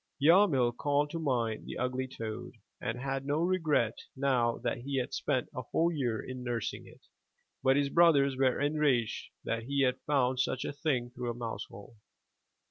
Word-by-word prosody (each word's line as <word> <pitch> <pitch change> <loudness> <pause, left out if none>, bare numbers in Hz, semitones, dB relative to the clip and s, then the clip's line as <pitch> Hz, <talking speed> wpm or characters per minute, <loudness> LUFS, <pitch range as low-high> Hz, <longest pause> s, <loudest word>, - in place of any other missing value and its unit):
Yarmil 145 -7 +5
called 145 +2 +1
to 165 - -3
mind 120 -7 -1
the - - -5
ugly 130 +1 -1
toad, 110 -4 -6 0.3
and 115 +2 -3
had 135 0 -2
no 145 +2 0
regret 155 -11 +1 0.2
now 130 -4 +1
that - - -2
he 135 +2 -3
had 130 +2 -2
spent 130 -2 0
a 125 - -4
whole 165 +7 +1
year 125 -8 -1
in 130 -1 -6
nursing 120 -3 -3
it; - - -16 0.6
but 130 0 +4
his 140 -1 +2
brothers 140 -5 +5
were 130 -1 +2
enraged 145 -6 +1
that 115 0 -2
he 140 +1 +1
had 125 -1 +1
found 130 -3 +2
such 130 - 0
a - - -3
thing 130 -5 -1
through 125 -1 -4
a 120 - -3
mousehole. 115 -2 -7
130 Hz, 175 wpm, -31 LUFS, 120-145 Hz, 0.6 s, Yarmil